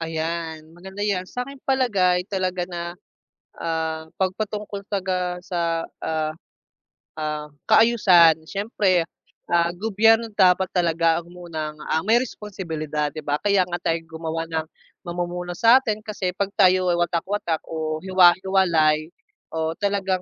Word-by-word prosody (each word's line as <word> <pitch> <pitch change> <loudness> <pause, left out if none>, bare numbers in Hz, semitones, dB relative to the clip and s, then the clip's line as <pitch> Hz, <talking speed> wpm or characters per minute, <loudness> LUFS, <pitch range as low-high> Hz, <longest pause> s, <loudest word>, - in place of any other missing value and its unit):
Ayan, 160 0 -4
maganda 190 +3 -10
yan 200 -3 0
sa'king 250 +7 -6
palagay 200 -10 +2
talaga 185 -2 -2
na, 170 -1 -5 0.7
ah, 160 -1 -2
'pag 185 -1 0
patungkol 210 -1 -5
talaga 185 -3 -1
sa 170 -2 -1 0.2
ah, 155 -1 -1 0.8
ah, 150 -1 -3 0.2
kaayusan 180 -9 +5
siyempre 195 -2 +1 0.5
ah, 170 0 +2
gobyerno 225 +3 +3
dapat 185 -1 +4
talaga 165 -2 +2
ang 170 +1 -8
munang, 160 -4 -5 0.2
ah, 160 +3 0
may 230 +3 +4
responsibilidad 160 - -4
di 155 -1 -9
ba? 145 +1 -1
Kaya 200 -2 +3
nga 175 0 -5
tayo 165 0 -1
gumawa 165 0 -4
ng 160 -1 -3 0.4
mamumuno 175 0 -4
satin 230 -2 +4
kasi 205 -3 -2
'pag 195 +2 -3
tayo 185 -2 +4
ay 170 - 0
watak-watak 175 -1 -1
o 155 -1 -3
hiwa-hiwalay, 175 -4 +4 0.4
o 160 0 -2
talagang 195 -2 0
175 Hz, 130 wpm, -23 LUFS, 160-195 Hz, 0.8 s, kaayusan